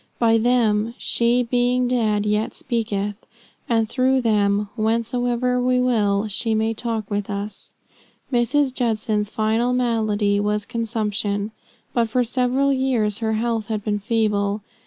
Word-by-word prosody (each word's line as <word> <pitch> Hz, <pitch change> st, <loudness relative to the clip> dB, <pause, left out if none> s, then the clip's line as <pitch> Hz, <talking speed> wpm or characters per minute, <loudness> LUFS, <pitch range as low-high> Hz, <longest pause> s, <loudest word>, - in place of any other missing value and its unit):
By 225 Hz, -1 st, +3 dB
them 230 Hz, -2 st, +2 dB
"she 240 Hz, +1 st, +1 dB
being 245 Hz, +1 st, +1 dB
dead 215 Hz, -4 st, +1 dB
yet 210 Hz, +1 st, 0 dB
speaketh," 210 Hz, -3 st, -2 dB, 0.6 s
and 225 Hz, -2 st, +2 dB
through 260 Hz, +2 st, +2 dB
them, 205 Hz, -2 st, +2 dB
whensoever 245 Hz, +2 st, 0 dB
we 250 Hz, 0 st, +2 dB
will, 215 Hz, -4 st, +1 dB
she 220 Hz, +2 st, 0 dB
may 220 Hz, +1 st, +1 dB
talk 225 Hz, -2 st, -3 dB
with 205 Hz, 0 st, -2 dB
us. 200 Hz, 0 st, -6 dB, 0.6 s
Mrs. 255 Hz, +3 st, +2 dB
Judson's 215 Hz, -4 st, -1 dB
final 225 Hz, +3 st, 0 dB
malady 215 Hz, -4 st, +1 dB
was 210 Hz, 0 st, -1 dB
consumption, 215 Hz, -3 st, -2 dB, 0.4 s
but 230 Hz, -2 st, +1 dB
for 250 Hz, +3 st, +2 dB
several 255 Hz, +3 st, +1 dB
years 245 Hz, -6 st, 0 dB
her 220 Hz, -1 st, -1 dB
health 225 Hz, -1 st, -1 dB
had 215 Hz, -2 st, -3 dB
been 205 Hz, -1 st, -1 dB
feeble. 210 Hz, -2 st, 0 dB
225 Hz, 135 wpm, -22 LUFS, 210-245 Hz, 0.6 s, By